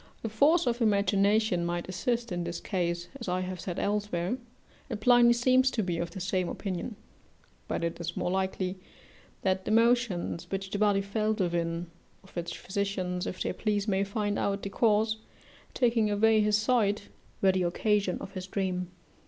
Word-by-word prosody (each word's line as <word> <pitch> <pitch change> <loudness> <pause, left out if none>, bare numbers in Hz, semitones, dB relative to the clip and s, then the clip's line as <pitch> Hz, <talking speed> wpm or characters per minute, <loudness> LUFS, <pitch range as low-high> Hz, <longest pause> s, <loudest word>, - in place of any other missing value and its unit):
The 225 - -2
force 290 +10 +4
of 240 0 0
imagination 200 -2 +3
might 175 0 -2
assist 235 +5 -1
in 175 -1 -2
this 170 0 -4
case, 175 -3 -2
as 235 - -7
I 180 +1 0
have 185 0 -4
said 175 -2 -4
elsewhere, 205 -1 -1 0.5
and 225 -4 -3
Pliny 240 +1 +6
seems 255 +2 +4
to 225 -4 -1
be 175 -2 -2
of 170 0 -2
the 180 - -8
same 185 -1 -1
opinion; 195 +3 -4 0.7
but - - -2
it 170 0 -2
is 170 0 -4
more 180 - -1
likely 190 0 -1 0.6
that 190 -1 +1
the - - -2
motions 225 -7 +2
which 195 0 -4
the 205 - -2
body 205 -2 +3
felt 215 +2 -1
within, 170 -1 -1 0.4
of 195 - -19
which 170 -1 -4
physicians, 190 -2 -2
if - - -3
they - - -1
please, 210 -1 -1
may 195 -1 +2
find 205 0 -1
out 200 0 -1
the 200 - -3
cause, 220 0 +2 0.6
taking 230 -4 +2
away 215 +1 +4
his 210 0 +3
sight, 215 -2 +1 0.3
were 195 - +5
the 185 0 0
occasion 195 +2 +1
of - - -7
his 185 -1 -6
dream. 185 -2 -2
200 Hz, 175 wpm, -29 LUFS, 180-220 Hz, 0.7 s, Pliny